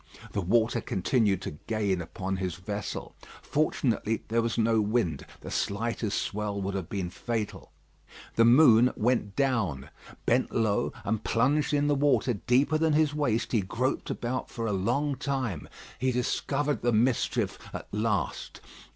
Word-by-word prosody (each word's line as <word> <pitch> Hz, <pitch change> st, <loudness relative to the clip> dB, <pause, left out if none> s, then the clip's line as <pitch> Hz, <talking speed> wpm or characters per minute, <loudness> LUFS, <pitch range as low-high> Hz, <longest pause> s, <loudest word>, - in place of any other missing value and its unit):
The 100 Hz, -, -1 dB
water 115 Hz, +5 st, +2 dB
continued 100 Hz, -1 st, +1 dB
to 75 Hz, -, -6 dB
gain 100 Hz, -5 st, 0 dB
upon 95 Hz, +3 st, -4 dB
his 90 Hz, -3 st, -2 dB
vessel. 100 Hz, +3 st, -5 dB, 0.3 s
Fortunately 120 Hz, -7 st, 0 dB
there 115 Hz, +1 st, +2 dB
was 115 Hz, 0 st, -2 dB
no 115 Hz, -1 st, +3 dB
wind. 105 Hz, -, 0 dB
The -, -, -8 dB
slightest 110 Hz, 0 st, -1 dB
swell 105 Hz, -1 st, -3 dB
would 100 Hz, 0 st, -2 dB
have 95 Hz, -4 st, -4 dB
been 95 Hz, -3 st, -3 dB
fatal. 110 Hz, +2 st, -4 dB, 0.6 s
The 115 Hz, -, +5 dB
moon 125 Hz, -1 st, +7 dB
went 110 Hz, -3 st, 0 dB
down. 110 Hz, -, 0 dB, 0.3 s
Bent 125 Hz, +2 st, +2 dB
low, 110 Hz, -3 st, +1 dB
and 110 Hz, +1 st, -1 dB
plunged 140 Hz, +6 st, +2 dB
in 145 Hz, -1 st, +2 dB
the 145 Hz, -, +3 dB
water 135 Hz, -4 st, +2 dB
deeper 130 Hz, +8 st, +2 dB
than 160 Hz, -1 st, +2 dB
his 150 Hz, -1 st, +3 dB
waist 130 Hz, -7 st, 0 dB
he 115 Hz, -, +2 dB
groped 125 Hz, +8 st, -2 dB
about 125 Hz, +2 st, -3 dB
for 115 Hz, -2 st, -4 dB
a 105 Hz, -, 0 dB
long 125 Hz, +9 st, 0 dB
time. 130 Hz, -, -3 dB, 0.3 s
He 130 Hz, +2 st, +1 dB
discovered 140 Hz, +4 st, -1 dB
the 120 Hz, -, +2 dB
mischief 115 Hz, +2 st, +1 dB
at -, -, -7 dB
last. 105 Hz, 0 st, -2 dB
115 Hz, 150 wpm, -28 LUFS, 100-130 Hz, 0.6 s, moon